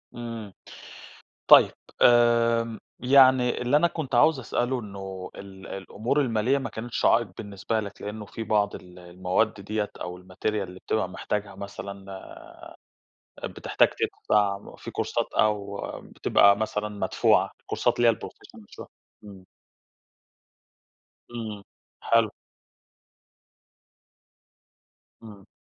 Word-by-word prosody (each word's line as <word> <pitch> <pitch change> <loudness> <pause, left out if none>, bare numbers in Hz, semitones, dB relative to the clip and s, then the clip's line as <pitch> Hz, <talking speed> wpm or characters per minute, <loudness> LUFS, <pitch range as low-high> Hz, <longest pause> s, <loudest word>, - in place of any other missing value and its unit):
إمم. 115 -4 -7 1.0
طيب. - - +8 0.3
آمم، 115 -1 +4 0.2
يعني 130 -1 +5
اللي 125 +4 +3
أنا 170 +3 +4
كنت 150 -7 -5
عاوز 140 +5 +5
أسأله 125 +1 -1
إنه 95 -3 -8
ال 95 -1 -11
الأمور 110 +8 -2
الماليّة 125 +1 +1
ما 135 - -5
كانتش 115 +2 -4
عائق 115 -3 +4
بالنسبة 105 +2 -3
لك، 100 -1 -9
لإنه 105 0 -6
في 115 - -7
بعض 105 -1 +1
ال 90 0 -11
المواد 90 +4 -1
دِيَّة 105 +1 -3
أو 90 0 -6
الmaterial 90 0 -9
اللي 95 -3 -4
بتبقى 110 -4 -1
محتاجها 100 +2 -4
مثلًا 100 0 -8 1.1
آآ، - - -9
بتحتاج - - +2
تدفَع 100 -1 -1
في - - -8
كورسات - - -2
أو 100 -2 0 0.2
بتبقى 100 0 +3
مثلًا 105 -1 -2
مدفوعة 105 -1 +2
الكورسات - - -1
اللي 120 -1 +5
هي - - +6
الprofessional - - -12
شو - - -9 0.4
إمم. 100 -3 -12 1.9
إمم. 110 -4 -6 0.4
حلو. 115 -2 +3 2.9
امم. 105 -3 -13
105 Hz, 110 wpm, -26 LUFS, 100-120 Hz, 2.9 s, طيب